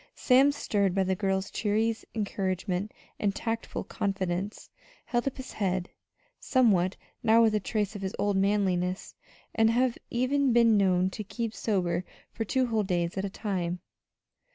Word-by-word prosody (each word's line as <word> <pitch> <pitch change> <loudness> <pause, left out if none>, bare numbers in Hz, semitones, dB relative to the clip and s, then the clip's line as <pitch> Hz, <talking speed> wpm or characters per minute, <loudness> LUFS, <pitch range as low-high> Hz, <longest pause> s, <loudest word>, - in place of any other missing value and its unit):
Sam, 270 +2 +5
stirred 200 -9 0
by 195 - +3
the 190 0 0
girl's 190 0 -1
cheery 220 +2 +1 0.2
encouragement 195 -1 -2 0.3
and 200 -1 0
tactful 225 -1 -3
confidence, 195 0 -3 0.4
held 240 +2 -1
up 275 - -2
his 260 -1 -7
head 185 -3 -1 0.5
sometimes 200 -9 +3 0.3
now 230 0 +5
with 220 -1 +3
a 210 - +2
trace 210 0 -2
of 200 - -6
his 190 0 -3
old 205 -1 +1
manliness, 190 -2 0 0.4
and 225 -1 +4
had 245 +1 +1
even 255 +2 +1
been 230 -2 +5
known 185 -2 +3
to 215 - -5
keep 220 +3 -4
sober 180 -6 0 0.3
for 225 - -3
two 260 +4 +1
whole 225 -3 +1
days 175 -3 -1
at 195 0 -2
a - - -2
time. 180 -4 -3
205 Hz, 155 wpm, -28 LUFS, 190-230 Hz, 0.5 s, Sam